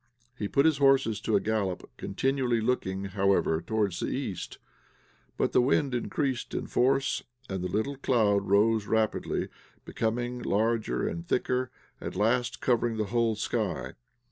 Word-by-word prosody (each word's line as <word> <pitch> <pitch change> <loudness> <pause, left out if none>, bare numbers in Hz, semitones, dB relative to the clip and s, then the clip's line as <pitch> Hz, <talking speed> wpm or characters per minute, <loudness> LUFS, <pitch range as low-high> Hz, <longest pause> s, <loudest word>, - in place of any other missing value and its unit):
He 105 -5 -3
put 140 +7 +2
his 155 -3 +3
horses 135 -6 +3
to 110 - +1
a - - +5
gallop, 100 -3 -2
continually 125 +2 0
looking, 100 -5 -1
however, 95 -4 +1
towards 105 -4 -1
the - - -1
east. - - -4 0.8
But - - +1
the - - +4
wind 135 +1 +2
increased 130 +1 -2
in - - -2
force, 135 +2 +1 0.3
the 95 -1 -3
little 105 +10 -2
cloud 105 -7 +2
rose 105 +1 +3
rapidly, 110 -1 0 0.4
became 120 +2 -2
larger 110 +2 0
and 170 0 -5
thicker, 125 -2 0 0.3
at - - -5
last 115 +5 +1
covering 120 -2 +1
the 110 - +1
whole 115 -2 +2
sky. 105 - -2
115 Hz, 145 wpm, -28 LUFS, 105-125 Hz, 0.8 s, a